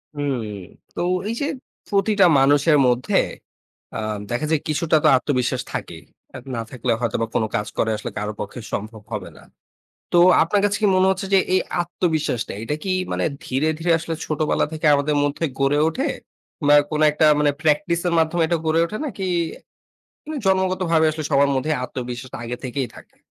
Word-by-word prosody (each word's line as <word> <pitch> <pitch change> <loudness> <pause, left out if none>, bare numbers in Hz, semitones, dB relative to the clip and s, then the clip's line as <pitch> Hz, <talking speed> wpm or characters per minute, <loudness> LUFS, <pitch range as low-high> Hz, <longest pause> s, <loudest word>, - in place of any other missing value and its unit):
হুম। 145 -2 -1 0.6
তো - - -2 0.3
এইযে 235 +5 -2 0.4
প্রতিটা 200 -1 +3
মানুষের 145 +3 +4
মধ্যে 125 0 +1 0.8
অ্যা - - -3 0.3
দেখা 120 +6 -1
যায় 155 -2 +2
কিছুটা 155 +1 +1
তো - - +5
আত্মবিশ্বাস 125 -2 -1
থাকেই। - - -6 0.3
আর 130 - -7
না 115 - -2
থাকলে 125 -1 -2
হয়তোবা 115 -1 0
কোন - - +2
কাজ 105 -1 -1
করাই 110 -1 +1
আসলে 105 - -6
কারো 105 +1 -3
পক্ষে 105 +4 -6
সম্ভব 110 +1 -5
হবে 100 -4 -4
না। - - -15 0.7
তো - - +3 0.3
আপনার 200 +5 +1
কাছে 205 0 +2
কি - - +5
মনে 185 0 +4
হচ্ছে 190 +1 -2
যে - - +7 0.2
এই 185 - +4 0.2
আত্মবিশ্বাসটা 160 -9 -2
এটা 135 +6 -2
কি 190 - -2 0.2
মানে - - -1 0.2
ধীরে, 135 +5 0
ধীরে 165 +1 +1
আসলে 165 0 -4
ছোটবেলা 155 0 0
থেকে 155 0 -2
আমাদের 145 +1 +1
মধ্যে 145 +3 -1
গড়ে 135 +1 +2
ওঠে 265 - -2 0.6
বা 145 - +6 0.2
কোন 155 -1 -1
একটা 150 +1 +1 0.2
মানে 145 -1 +4
practice 170 +3 +1
এর 170 - 0
মাধ্যমে 165 +1 +2
এটা 170 0 0
গড়ে 160 +1 +3
ওঠে? 190 +6 -5
নাকি 220 -8 -6 1.1
নে - - -4
জন্মগতভাবে 185 -4 +2
আসলে 155 0 -5
সবার 140 0 +4
মধ্যে 130 +4 -1
আত্মবিশ্বাসটা 125 -1 -6
আগে 125 +1 -4
থেকেই 130 0 -2
থাকে? - - -16
150 Hz, 170 wpm, -22 LUFS, 125-170 Hz, 1.1 s, যে